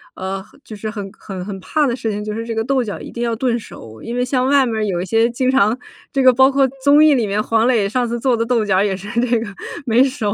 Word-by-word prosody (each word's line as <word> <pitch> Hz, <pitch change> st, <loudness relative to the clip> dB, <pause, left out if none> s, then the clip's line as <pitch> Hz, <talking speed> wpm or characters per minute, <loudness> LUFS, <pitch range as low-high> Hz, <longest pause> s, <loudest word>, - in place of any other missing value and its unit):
呃， 190 Hz, +1 st, -4 dB, 0.2 s
就 -, -, -11 dB
是 215 Hz, +1 st, -5 dB
很 205 Hz, -3 st, -6 dB
很 190 Hz, -3 st, -7 dB
很 195 Hz, 0 st, -6 dB
怕 300 Hz, +10 st, 0 dB
的 250 Hz, -, 0 dB
事 225 Hz, -2 st, -3 dB
情， 205 Hz, 0 st, -4 dB
就 210 Hz, 0 st, -4 dB
是 225 Hz, +1 st, -4 dB
这 230 Hz, -1 st, -4 dB
个 225 Hz, -, 0 dB
豆 265 Hz, +2 st, +1 dB
角 215 Hz, -4 st, -4 dB
一 -, -, -9 dB
定 235 Hz, -, -6 dB
要 235 Hz, -1 st, -1 dB
炖 240 Hz, 0 st, 0 dB
熟， 110 Hz, -, -12 dB
因 235 Hz, -, -5 dB
为 245 Hz, -, 0 dB
像 255 Hz, 0 st, 0 dB
外 275 Hz, -1 st, +4 dB
面 235 Hz, -2 st, -2 dB
儿 215 Hz, -, 0 dB
有 180 Hz, -4 st, -1 dB
一 -, -, -3 dB
些 225 Hz, +5 st, +2 dB
经 255 Hz, +2 st, 0 dB
常 225 Hz, -3 st, +3 dB, 0.4 s
这 270 Hz, -, +1 dB
个 260 Hz, -, +8 dB
包 265 Hz, +2 st, +5 dB
括 275 Hz, 0 st, +3 dB, 0.2 s
综 285 Hz, +2 st, +6 dB
艺 310 Hz, -1 st, +6 dB
里 240 Hz, -5 st, +1 dB
面 205 Hz, +2 st, 0 dB
黄 225 Hz, +1 st, +2 dB
磊 225 Hz, -6 st, +2 dB
上 245 Hz, +3 st, 0 dB
次 235 Hz, +1 st, -2 dB
做 245 Hz, 0 st, +1 dB
的 230 Hz, -, 0 dB
豆 235 Hz, -2 st, +1 dB
角 190 Hz, -2 st, +2 dB
也 200 Hz, -1 st, 0 dB
是 195 Hz, +2 st, -9 dB
这 240 Hz, 0 st, +2 dB
个 225 Hz, 0 st, -4 dB, 0.4 s
没 235 Hz, 0 st, +3 dB
熟。 255 Hz, -6 st, 0 dB
230 Hz, 315 characters per minute, -19 LUFS, 210-255 Hz, 0.4 s, 个